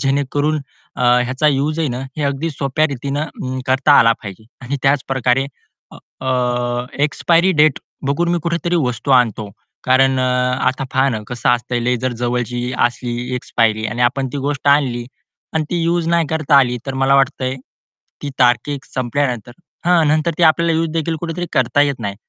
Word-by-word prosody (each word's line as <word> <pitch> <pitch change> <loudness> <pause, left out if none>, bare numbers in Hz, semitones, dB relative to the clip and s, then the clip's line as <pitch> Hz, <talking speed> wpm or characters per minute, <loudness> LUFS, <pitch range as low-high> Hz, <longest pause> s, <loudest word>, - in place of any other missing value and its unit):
जेणेकरून 145 +2 0 0.4
ह्याचा 125 +3 +2
युज 150 +3 0
आहे 160 - 0
ना 125 0 -4 0.2
हे 155 - -2
अगदी 140 +4 -1
सोप्या 145 +1 0
रीतीने 140 -1 -4
करता 130 +3 +3
आला 115 0 +6
पाहिजे. 100 +1 -9 0.2
आणि 130 +3 -3
त्याच 135 0 +2
प्रकारे 130 0 +1 0.8
अ, 125 -1 -1 0.2
एक्सपायरी 170 +4 +2
डेट 150 -4 +3 0.3
बघून 155 +5 0
मी 175 - +1
कुठेतरी 170 +1 -1
वस्तू 125 +3 -3
आणतो. 115 -5 +2 0.3
कारण 130 +1 +3
अ, - - +1 0.4
आता 130 +1 -3
पहा 135 +1 +3
ना 115 - -2
कसं 120 +1 -3
असतंय 120 0 0
लई 125 +1 +1
जर 130 -1 0
जवळची 125 0 -2
असली 120 +1 -4
एक्सपायरी 110 -3 0
आणि 120 +2 -2
आपण 130 +2 +1
ती - - -3
गोष्ट 140 0 -2
आणली 135 -4 +2 0.5
आणि 160 -1 +1
ती 175 -1 0
युज 170 0 0
नाही 170 -1 +2
करता 155 -2 +2
आली 125 -2 +2
तर 135 - -3
मला 135 +1 +2
वाटतंय, 135 -1 +1 0.7
ती 145 - -4
तारीख 125 +3 +2
संपल्यानंतर 125 -2 -2 0.3
हां. 175 -3 +4
नंतर 155 +2 +1
ती - - +1
आपल्याला 165 +1 +3
युज 165 0 0
देखील 165 0 -1
कुठेतरी 170 +1 -4
करता 145 - +2
येत 140 -4 -1
नाही. 100 -2 -3
135 Hz, 165 wpm, -18 LUFS, 125-150 Hz, 0.8 s, आला